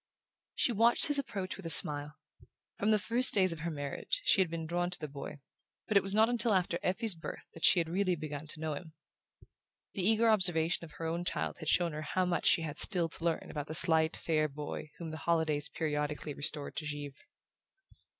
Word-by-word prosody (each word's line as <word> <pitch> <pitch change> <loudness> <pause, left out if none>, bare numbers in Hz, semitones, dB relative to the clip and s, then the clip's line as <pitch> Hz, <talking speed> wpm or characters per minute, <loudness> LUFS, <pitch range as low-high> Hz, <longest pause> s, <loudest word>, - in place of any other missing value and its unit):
She - - 0
watched 230 +2 +2
his 290 -1 -1
approach 195 -8 -6
with 195 - -13
a - - -3
smile. 150 -1 +10 0.6
From 205 - -1
the 215 - +3
first 235 +5 +2
days 185 -3 +3
of 165 - -11
her 165 +2 -5
marriage 150 - -5
she 205 - +3
had 180 - -1
been 165 -1 -6
drawn 175 +2 -3
to 180 - -7
the 155 - -7
boy, 140 0 -10 0.5
but 215 - -3
it 200 - +5
was 195 +1 -4
not 220 +1 +3
until 235 -3 0
after 175 -2 -2
Effie's 210 +3 0
birth 165 - -10
that 165 - -13
she 180 - +5
had 165 - -2
really 185 +1 -2
begun 150 -1 -8
to 155 - -9
know 160 -1 -4
him. 160 0 -10 1.0
The 195 - -5
eager 220 +4 +1
observation 175 -6 +1
of 155 - -17
her 165 - -8
own 170 +2 -4
child - - -4
had 155 -2 -5
shown 175 -2 +1
her 155 - -6
how 185 +4 -2
much 175 -2 -2
she 170 -2 +2
had 150 -2 -5
still 175 -5 +2
to 165 - -8
learn 170 -1 -3
about 150 -1 -7
the 155 - -4
slight 160 -1 +4
fair 155 -2 -1
boy 150 +1 -8
whom 165 -2 -8
the 155 - -8
holidays 160 -3 -1
periodically 150 -1 -5
restored 145 0 -6
to 155 - -5
Givre. 145 -1 -8
165 Hz, 220 wpm, -30 LUFS, 155-190 Hz, 1.0 s, smile